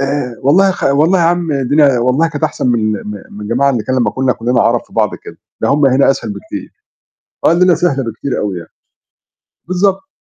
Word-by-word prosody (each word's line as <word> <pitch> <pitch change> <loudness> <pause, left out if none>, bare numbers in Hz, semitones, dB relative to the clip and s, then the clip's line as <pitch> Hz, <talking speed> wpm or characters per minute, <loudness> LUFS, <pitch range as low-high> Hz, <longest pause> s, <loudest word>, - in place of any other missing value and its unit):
آآ، 135 -3 -2
والله 190 +8 +4
خ - - -4
والله 155 +7 +3
يا 170 - +2
عم 170 -2 0
الدنيا 140 -1 +2
والله 130 +7 +1
كانت 155 -1 -3
أحسن 150 - -2
من 110 -3 +1
ال - - -9
م - - -4 0.2
من 105 - -9
الجماعة 125 +7 +1
اللي 120 -4 -1
كان 130 - -1
لمّا 125 - +1
كنّا 130 -1 0
كُلنا 120 +1 0
عرب 115 0 +2
في - - -25
بعض 110 -3 +1
كده، - - -11 0.3
ده - - +1
هُم 145 0 +3
هنا 135 +1 +3
أسهل 135 - -3
بكتير، 300 +4 -8 0.7
آه، - - +5
الليلة 180 0 +4
سهلة 155 -5 0
بكتير 115 +4 -4
أوي 100 -3 -2
يعني، 85 - -12 1.0
بالضبط. 190 +5 0
140 Hz, 210 wpm, -14 LUFS, 120-170 Hz, 1.0 s, آه